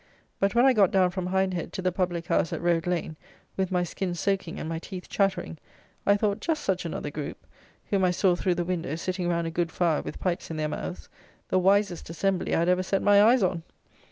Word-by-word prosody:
But, 195 +3 +1
when 240 +2 +5
I 265 - +6
got 200 -5 +5
down 185 -2 +3
from 180 0 -3
Hindhead 185 -2 -1
to - - -4
the 185 - +2
public 175 -2 -2
house 165 - +1
at - - -3
Road 170 -1 +1
Lane, 170 -3 -2 0.4
with 190 -1 -1
my 180 -1 +2
skin 175 +1 -3
soaking 195 -1 -1
and - - -4
my 165 0 -3
teeth 180 +1 -8
chattering, 190 - -1 0.5
I 200 0 +5
thought 205 0 0
just 315 +2 -1
such 185 -2 -1
another 155 -2 -4
group, 150 -1 -6 0.5
whom 195 -2 +2
I 180 - +4
saw 180 0 +2
through 180 0 0
the 175 0 -1
window 170 -4 -2
sitting 180 +1 -3
round 170 -1 0
a 165 - -3
good 170 0 -1
fire 170 -3 +1
with - - -7
pipes 180 -2 -2
in 160 - -4
their 155 0 -1
mouths, 175 - -5 0.4
the 185 - +3
wisest 195 -2 +2
assembly 185 +3 0
I - - +2
had 170 - +2
ever 180 0 +3
set 190 +1 -1
my 205 0 +6
eyes 235 +2 +5
on. 175 -2 0
180 Hz, 230 wpm, -27 LUFS, 170-195 Hz, 0.5 s, I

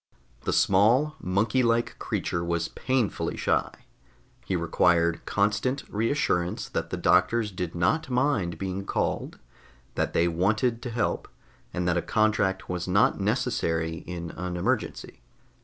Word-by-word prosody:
The - - +1
small, 120 +11 +3
monkey 110 +4 +1
like 115 -1 +1
creature 85 -1 -2
was 85 -1 -1
painfully 130 -5 -1
shy; - - +1 0.7
he - - -2
required 85 -1 +2
constant 105 +7 0
reassurance 105 -6 0
that - - -3
the 90 - -3
doctors 95 +6 +3
did 90 -2 -4
not 155 - +1
mind 125 - +1
being 95 0 -3
called, - - -2 0.6
that - - -1
they 85 - +3
wanted 105 +8 +1
to 125 - -5
help, 115 0 -1 0.4
and 90 0 -2
that 90 -1 +2
a - - +1
contract 110 -3 +1
was 90 0 -3
not 100 +3 +3
necessary 95 -8 0
in 85 -1 -5
an 90 0 -4
emergency. 85 - -2
95 Hz, 135 wpm, -27 LUFS, 85-115 Hz, 0.7 s, small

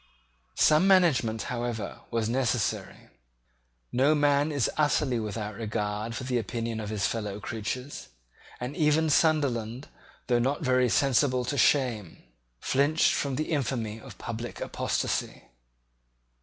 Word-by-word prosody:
Some 155 +5 +4
management, 145 - +3
however, 120 -4 -4
was 115 -2 -1
necessary. 120 -2 -1 0.8
No 140 +5 +3
man 145 +1 +2
is 140 -5 +1
utterly 145 -4 +1
without 105 0 -4
regard 105 +1 -3
for - - -5
the 125 -1 0
opinion 115 0 -3
of 105 -2 -5
his 105 -2 -1
fellow 105 -3 -3
creatures; 120 - -5 0.5
and 125 +4 -5
even 155 +1 +2
Sunderland, 135 -6 +1 0.4
though 120 -1 +2
not 135 +6 0
very 130 -2 +3
sensible 130 0 +2
to 145 - -2
shame, 125 - +1 0.4
flinched 145 - +2
from 140 -2 -1
the 155 +4 -3
infamy 115 -7 -2
of - - -12
public 115 +1 -6
apostasy. - - -2
125 Hz, 125 wpm, -28 LUFS, 110-145 Hz, 0.8 s, Some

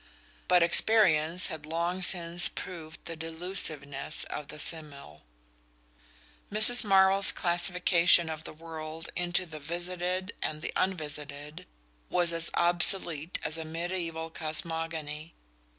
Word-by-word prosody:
But 180 -1 +3
experience 170 -3 +3
had 155 -1 -7
long 170 +3 -4
since 175 -1 +4
proved 160 -3 -11
the 165 - -8
delusiveness 160 -3 -1
of 150 - -8
the - - -11
simile. 145 - 0 1.3
Mrs. 220 +4 +7
Marvell's 195 -1 +4
classification 175 -1 +2
of 160 -1 -8
the - - -9
world 160 0 -11
into 175 +1 -2
the 155 -3 -11
visited 180 +4 -6
and 155 0 -6
the - - -7
unvisited 150 -4 -6 0.4
was 175 -1 -1
as 165 0 +2
obsolete 175 -2 +2
as 160 +1 -3
a - - -6
mediaeval 165 0 -7
cosmogony. 160 -1 -4
165 Hz, 115 wpm, -26 LUFS, 155-180 Hz, 1.3 s, Mrs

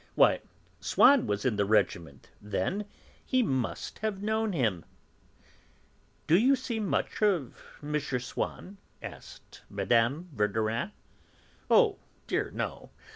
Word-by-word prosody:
Why, - - +5 0.4
Swann 275 -3 +5
was 100 +2 -1
in 120 -5 +1
the 100 - +3
regiment 85 -8 0
then; 105 - -2 0.4
he 255 -1 +2
must 130 - -2
have 215 -3 -2
known 220 0 0
him." 110 - 0 1.4
"Do 160 - +4
you 265 +5 +5
see 245 -3 -4
much 210 0 -1
of 185 - +1 0.3
M. 150 +1 0
Swann?" 135 +9 -4 0.3
asked - - -11
Mme. 120 +7 +1
Verdurin. 110 - 0 0.8
"Oh 445 -5 +5 0.3
dear, - - -1
no!" - - -5
145 Hz, 115 wpm, -29 LUFS, -, 1.4 s, Why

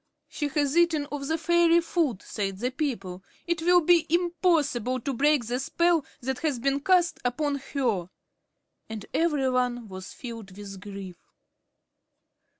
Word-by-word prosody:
"She 295 - -3
has 290 0 0
eaten 335 -4 +3
of 280 -1 -4
the 320 +1 0
fairy 340 +1 +4
food," 325 - -1
said 195 -3 -3
the 245 +5 -2
people. 210 - -3 0.2
"It 340 -1 -1
will 355 +1 +5
be 340 0 +4
impossible 325 - +1
to 275 - -2
break 285 0 +3
the 245 +3 -2
spell 340 +3 +2 0.2
that 265 +1 -3
has 300 -5 0
been 275 +3 0
cast 350 +2 +2
upon 280 +4 0 0.2
her." 220 -10 0 0.8
And 215 -2 -6
every 300 -5 +1
one 245 -2 0
was 185 0 -8
filled 225 -6 -9
with 200 -2 -8
grief. 195 -3 -8
275 Hz, 150 wpm, -27 LUFS, 230-330 Hz, 0.8 s, will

